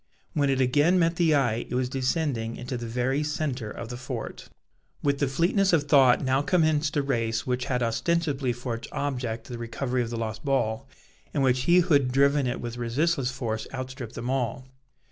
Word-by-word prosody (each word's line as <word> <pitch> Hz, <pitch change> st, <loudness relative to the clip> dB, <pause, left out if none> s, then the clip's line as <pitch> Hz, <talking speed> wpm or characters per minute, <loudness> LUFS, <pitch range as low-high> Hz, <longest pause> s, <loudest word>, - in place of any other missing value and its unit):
When 145 Hz, -2 st, +2 dB
it 135 Hz, -1 st, +1 dB
again 145 Hz, +8 st, +3 dB
met 165 Hz, -1 st, +2 dB
the 165 Hz, -3 st, +4 dB
eye, 120 Hz, -5 st, +1 dB
it -, -, -3 dB
was 125 Hz, 0 st, +1 dB
descending 130 Hz, -3 st, -1 dB
into 125 Hz, +1 st, -5 dB
the 120 Hz, -1 st, -4 dB
very 125 Hz, +4 st, 0 dB
centre 150 Hz, -6 st, -2 dB
of 115 Hz, -, -7 dB
the 120 Hz, -, -5 dB
fort. 125 Hz, -3 st, -6 dB, 0.5 s
With 140 Hz, -1 st, +1 dB
the 140 Hz, -, +2 dB
fleetness 175 Hz, +7 st, +2 dB
of 160 Hz, -3 st, +4 dB
thought 140 Hz, -3 st, +5 dB
now 130 Hz, +1 st, +2 dB
commenced 155 Hz, -3 st, +2 dB
a 145 Hz, -, +2 dB
race 115 Hz, -4 st, -1 dB
which 125 Hz, 0 st, -1 dB
had 125 Hz, -2 st, 0 dB
ostensibly 140 Hz, +2 st, 0 dB
for 120 Hz, 0 st, -4 dB
its 115 Hz, 0 st, -6 dB
object 125 Hz, -5 st, -2 dB
the 120 Hz, -2 st, -7 dB
recovery 125 Hz, +2 st, -2 dB
of 115 Hz, -, -2 dB
the 115 Hz, -, -4 dB
lost 110 Hz, -1 st, -4 dB
ball, 115 Hz, -5 st, 0 dB, 0.5 s
and 140 Hz, -, +2 dB
in -, -, +3 dB
which 130 Hz, -1 st, +2 dB
he 175 Hz, +1 st, +6 dB
who 175 Hz, -2 st, +1 dB
had 135 Hz, -3 st, +3 dB
driven 140 Hz, +1 st, +3 dB
it 120 Hz, -, -2 dB
with 120 Hz, 0 st, -5 dB
resistless 130 Hz, +4 st, 0 dB
force 115 Hz, -5 st, -3 dB
outstripped 130 Hz, -3 st, -6 dB
them 120 Hz, +2 st, -3 dB
all. 130 Hz, -1 st, -2 dB
130 Hz, 200 wpm, -26 LUFS, 120-145 Hz, 0.5 s, he